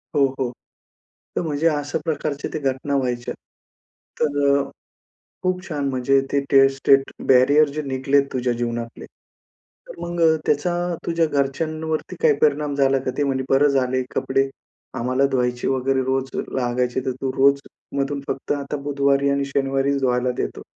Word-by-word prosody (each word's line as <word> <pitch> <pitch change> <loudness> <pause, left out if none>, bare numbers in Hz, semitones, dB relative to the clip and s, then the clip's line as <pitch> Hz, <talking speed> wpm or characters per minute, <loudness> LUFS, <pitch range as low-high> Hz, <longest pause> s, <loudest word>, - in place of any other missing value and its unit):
हो, 140 - +5
हो. 125 -2 -1 0.8
तर - - +1
म्हणजे 160 -1 0
अशा 145 -2 0
प्रकारच्या 150 -2 -2
त्या 155 - -3
घटना 135 +2 -3
व्हायच्या. 125 -2 -2 0.9
तर 140 -2 +3 0.8
खूप 185 0 -1
छान 145 -4 -2
म्हणजे 135 +1 +2
ते 140 - +3
टेस्ट 135 -1 +5
स्टेट 135 0 +4 0.2
बॅरियर 140 +4 +5
जे 155 - -2
निघलेत 135 0 +1
तुझ्या 125 -1 0
जीवनातले. 120 -1 -4 0.8
तर - - -10
मग 175 0 -4 0.3
त्याचा 150 +4 +1 0.3
तुझ्या 165 -1 +2
घरच्यांवरती 155 +4 -2
काही 155 -2 +5
परिणाम 150 -1 +2
झाला 135 -1 +3
का? - - +2
ती 145 - +1
म्हणे, 135 -1 0
"बरं 140 +2 +5
झालं 130 -2 +1
आहे 130 - +1
कपडे 135 +1 +1 0.5
आम्हाला 130 +3 +1
धुवायचे 125 -2 0
वगैरे 135 0 +1
रोज 130 0 -1 0.2
लागायचे 125 0 -1
तर 130 - +1
तू 135 - 0
रोज 140 +1 +4 0.4
मधून 140 +1 -1
फक्त 135 - -2
आता 145 0 -3
बुधवारी 140 -1 +2
आणि 140 0 +1
शनिवारीच 140 0 0
धुवायला 125 -1 +1
देतो." - - -5
140 Hz, 150 wpm, -22 LUFS, 130-145 Hz, 0.9 s, हो